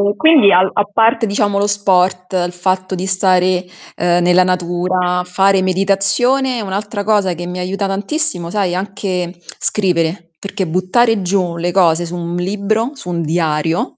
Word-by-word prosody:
quindi 295 Hz, -6 st, +5 dB
al 185 Hz, +2 st, +4 dB
a 205 Hz, -, +2 dB
parte 225 Hz, +2 st, +2 dB
diciamo 205 Hz, -1 st, 0 dB
lo 205 Hz, -, +1 dB
sport, 185 Hz, -2 st, +1 dB
il 175 Hz, -, -6 dB
fatto 185 Hz, +1 st, -2 dB
di 185 Hz, +1 st, -4 dB
stare, 185 Hz, -1 st, +2 dB, 0.3 s
ehm, 175 Hz, 0 st, +1 dB
nella 180 Hz, +1 st, +4 dB
natura, 180 Hz, 0 st, -1 dB
fare 190 Hz, +1 st, +2 dB
meditazione, 200 Hz, +7 st, +1 dB
un'altra 205 Hz, +1 st, -4 dB
cosa 200 Hz, -3 st, +1 dB
che 175 Hz, +1 st, -7 dB
mi 180 Hz, +1 st, -6 dB
aiuta 195 Hz, +2 st, -2 dB
tantissimo 200 Hz, -, -1 dB
sai 190 Hz, -2 st, -1 dB
anche 185 Hz, -2 st, -4 dB, 0.2 s
scrivere, 170 Hz, -3 st, -1 dB
perché 195 Hz, -1 st, -4 dB
buttare 200 Hz, +6 st, +1 dB
giù 180 Hz, -2 st, -1 dB
le 175 Hz, +1 st, -2 dB
cose 175 Hz, -2 st, +2 dB
su 170 Hz, +1 st, -6 dB
un 170 Hz, 0 st, -5 dB
libro, 210 Hz, +6 st, -1 dB
su 180 Hz, -, -8 dB
un 170 Hz, -1 st, -2 dB
diario, 160 Hz, 0 st, -1 dB
185 Hz, 155 wpm, -16 LUFS, 175-200 Hz, 0.3 s, quindi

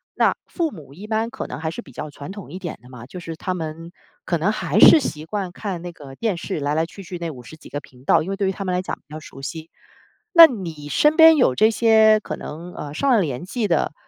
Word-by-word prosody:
那 -, -, +3 dB
父 335 Hz, -4 st, -2 dB
母 150 Hz, -7 st, -12 dB
一 195 Hz, +8 st, -10 dB
般 220 Hz, +1 st, -1 dB
可 -, -, -6 dB
能 -, -, -7 dB
还 160 Hz, 0 st, -2 dB
是 -, -, -7 dB
比 135 Hz, -, -16 dB
较 150 Hz, +5 st, -6 dB
传 145 Hz, +4 st, -9 dB
统 195 Hz, -7 st, -10 dB
一 185 Hz, -, -7 dB
点 175 Hz, -4 st, -6 dB
的 125 Hz, -, -16 dB
嘛， 125 Hz, -2 st, -11 dB
就 180 Hz, +8 st, -9 dB
是 165 Hz, -1 st, -7 dB
他 185 Hz, +2 st, -3 dB
们 165 Hz, -1 st, -6 dB, 0.3 s
可 170 Hz, -, 0 dB
能 175 Hz, +6 st, +1 dB
还 185 Hz, -3 st, -1 dB
是 315 Hz, -, +9 dB
习 155 Hz, -, -4 dB
惯 195 Hz, 0 st, -4 dB
看 185 Hz, -2 st, -5 dB
那 175 Hz, -, -6 dB
个 140 Hz, -4 st, -12 dB
电 215 Hz, +4 st, -1 dB
视， 170 Hz, +1 st, -4 dB
来 145 Hz, +1 st, -1 dB
来 160 Hz, +1 st, +1 dB
去 195 Hz, +4 st, -12 dB
去 180 Hz, 0 st, -7 dB
那 170 Hz, -1 st, -3 dB
50 125 Hz, +3 st, -11 dB
几 160 Hz, -, -14 dB
个 145 Hz, -, -4 dB
频 130 Hz, -3 st, -19 dB
道， -, -, +4 dB
因 175 Hz, -, -6 dB
为 -, -, -1 dB
对 195 Hz, -1 st, -1 dB
于 -, -, +1 dB
他 195 Hz, +1 st, -6 dB
们 185 Hz, -, -1 dB
来 180 Hz, -, 0 dB
讲 -, -, -4 dB
比 150 Hz, -, -14 dB
较 155 Hz, -, -6 dB
熟 135 Hz, -3 st, -12 dB
悉。 160 Hz, +3 st, -7 dB, 0.7 s
那 335 Hz, -1 st, +12 dB
你 165 Hz, -, -7 dB
身 300 Hz, -, +3 dB
边 320 Hz, -1 st, +8 dB
有 190 Hz, -, +3 dB
这 215 Hz, -, +4 dB
些 220 Hz, -1 st, +5 dB
可 -, -, -5 dB
能， 170 Hz, +4 st, -9 dB
呃， 145 Hz, -1 st, -7 dB
上 275 Hz, -, 0 dB
了 230 Hz, -4 st, +4 dB
年 140 Hz, -3 st, -3 dB
纪 215 Hz, +3 st, -2 dB
的， 165 Hz, -, +1 dB
175 Hz, 290 characters per minute, -22 LUFS, 150-210 Hz, 0.7 s, 那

